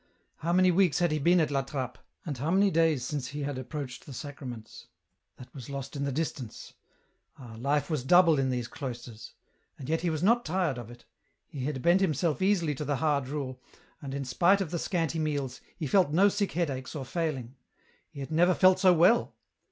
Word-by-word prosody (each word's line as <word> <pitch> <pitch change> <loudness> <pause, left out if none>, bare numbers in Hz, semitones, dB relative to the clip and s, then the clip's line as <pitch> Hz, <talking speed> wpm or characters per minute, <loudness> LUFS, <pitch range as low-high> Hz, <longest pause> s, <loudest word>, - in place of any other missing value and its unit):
How 165 - -2
many 185 +1 +4
weeks 180 -3 +3
had 175 -2 +2
he 155 - 0
been 175 +5 +4
at 155 -3 +1
La 135 -1 +1
Trappe, 135 -2 -5 0.3
and 150 -4 -3
how 140 +5 -3
many 195 +2 +3
days 160 -5 +2
since 140 -3 -3
had 145 0 -4
he 130 - -4
approached 130 0 -7
the 140 - -8
Sacraments? 125 -5 -8 0.5
that 125 -1 -13
was 130 -4 -9
lost 140 0 -6
in 140 0 -2
the 140 - -1
distance. 135 -5 -5 0.6
Ah, 120 -4 -11
life 145 +3 0
was 155 -6 -2
double 165 +1 +5
in 135 -1 +1
these 125 -2 -2
cloisters! 120 -4 -8 0.4
And 130 - -8
yet 160 +2 0
he 175 - 0
was 155 0 -2
not 235 +4 +4
tired 165 -6 -1
of 120 -2 -9
it; 120 0 -14 0.4
he 135 -3 -6
had 135 -3 -3
bent 175 +3 +4
himself 165 -2 0
easily 185 -6 +2
to 145 - -5
the 145 0 0
hard 145 -2 0
rule, 130 -3 -5 0.4
and, 135 -1 -6
in 140 -1 -3
spite 175 +10 +3
of 190 -6 -3
the 170 - -2
scanty 165 -3 -1
meals, 145 -4 -2 0.2
he 160 - -4
felt 180 +3 +3
no 190 +6 +5
sick 200 0 -1
headaches 140 -5 -3
or 140 -3 -4
failing; 135 -6 -3 0.6
he 140 - -9
had 135 - -7
never 175 +3 +4
felt 185 0 +5
so 185 -1 +6
well 180 +9 +3
150 Hz, 210 wpm, -29 LUFS, 130-170 Hz, 0.6 s, so